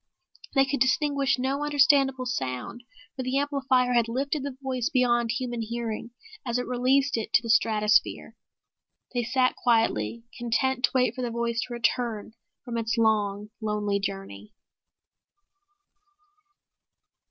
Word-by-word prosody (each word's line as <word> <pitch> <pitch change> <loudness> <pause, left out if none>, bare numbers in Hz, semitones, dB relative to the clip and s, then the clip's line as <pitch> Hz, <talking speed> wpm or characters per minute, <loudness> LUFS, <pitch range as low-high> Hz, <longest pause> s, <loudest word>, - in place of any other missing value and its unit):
They 270 0 +5
could 275 0 -2
distinguish 275 +1 +2
no 270 +3 -1
understandable 280 -3 +3
sound 130 - -4 0.3
for 260 - -4
the 255 +1 -1
amplifier 270 -3 +1
had 235 -2 +3
lifted 275 +5 -2
the 270 -1 -6
voice 260 -1 -2
beyond 240 -3 +2
human 240 -1 -2
hearing 230 0 -4 0.3
as 240 -3 -1
it 250 - -2
released 260 +2 +1
it 225 - -4
to 240 - +4
the 230 - 0
stratosphere. 215 -1 +2 0.8
They 245 - 0
sat 255 +2 +1
quietly, 230 0 +1 0.2
content 250 +2 +1
to - - -6
wait 255 -1 +3
for 255 - -6
the 245 - -2
voice 235 0 -1
to 245 - -7
return 230 -2 -1 0.3
from 235 -2 -3
its 225 0 -2
long, 210 -2 +1
lonely 210 -2 -1
journey. 195 - -6
245 Hz, 135 wpm, -26 LUFS, 225-265 Hz, 0.8 s, They